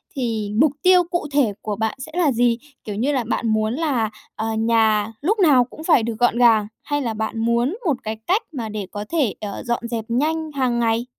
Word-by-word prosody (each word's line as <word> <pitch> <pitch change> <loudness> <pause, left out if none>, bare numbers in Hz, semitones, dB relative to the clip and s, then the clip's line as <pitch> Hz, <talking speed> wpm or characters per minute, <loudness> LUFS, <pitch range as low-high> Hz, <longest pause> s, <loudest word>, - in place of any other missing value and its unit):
thì 225 -5 -2
mục 305 -1 +5
tiêu 365 -1 +6
cụ 345 -2 -3
thể 265 -8 +2
của 210 - -3
bạn 220 +1 -1
sẽ 285 +5 -8
là 330 -6 +3
gì? 235 -1 +2 0.3
Kiểu 210 -2 -5
như 255 +7 0
là, 260 -4 0
bạn 235 - -1
muốn 220 +1 +1
là, 265 -8 0 0.3
ờ, 220 - -3
nhà 220 -2 +2
lúc 410 +9 +1
nào 285 -9 +6
cũng 280 +5 -11
phải 320 -9 +4
được 230 -1 -3
gọn 240 -1 +3
gàng, 225 -4 +5 0.2
hay 290 0 -1
là 230 -3 -2
bạn 220 +1 -3
muốn 235 - +1
một 315 - +3
cái 220 0 -4
cách 390 +5 +3
mà 235 -7 -5
để 210 -2 -4
có 205 0 -5
thể, 285 - +1
ờ, 205 -2 -5
dọn 235 0 -2
dẹp 230 -2 -3
nhanh 310 +5 0
hàng 250 -3 +1
ngày? 230 0 +1
235 Hz, 225 wpm, -21 LUFS, 220-290 Hz, 0.3 s, tiêu